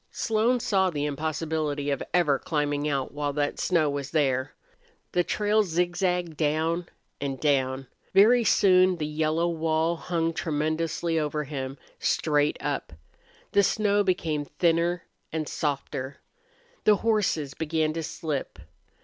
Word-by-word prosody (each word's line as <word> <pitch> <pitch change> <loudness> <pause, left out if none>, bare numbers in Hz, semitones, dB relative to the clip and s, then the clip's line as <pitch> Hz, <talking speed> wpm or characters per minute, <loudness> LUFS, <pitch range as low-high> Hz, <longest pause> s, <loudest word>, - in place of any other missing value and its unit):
Slone 230 +3 +1
saw 195 -5 +2
the 145 -4 -2
impossibility 155 -1 -2
of 140 - -1
ever 150 -6 +3
climbing 145 -1 -1
out 135 -2 -1
while 145 -1 -2
that 145 0 -1
snow 170 -4 +2
was 140 -1 -3
there. 135 -3 0 0.6
The 175 - +2
trail 210 +3 +2
zigzagged 175 -1 0
down 160 +3 0 0.3
and 135 -2 -3
down. 135 -2 +1 0.3
Very 230 +5 +6
soon 185 -3 +5
the 155 - -2
yellow 155 +2 0
wall 165 0 0
hung 165 -1 -1
tremendously 160 +1 -1
over 150 0 -1
him, 135 -1 -5 0.2
straight 150 -1 +1
up. 145 - -3 0.6
The 200 - +5
snow 205 +1 +2
became 160 -6 -1
thinner 170 +2 +1 0.3
and 155 -1 -2
softer. 140 -2 -3 0.7
The 210 - +6
horses 185 -11 +1
began 160 -1 -1
to 165 - -3
slip. 155 - -4
160 Hz, 130 wpm, -26 LUFS, 145-175 Hz, 0.7 s, Very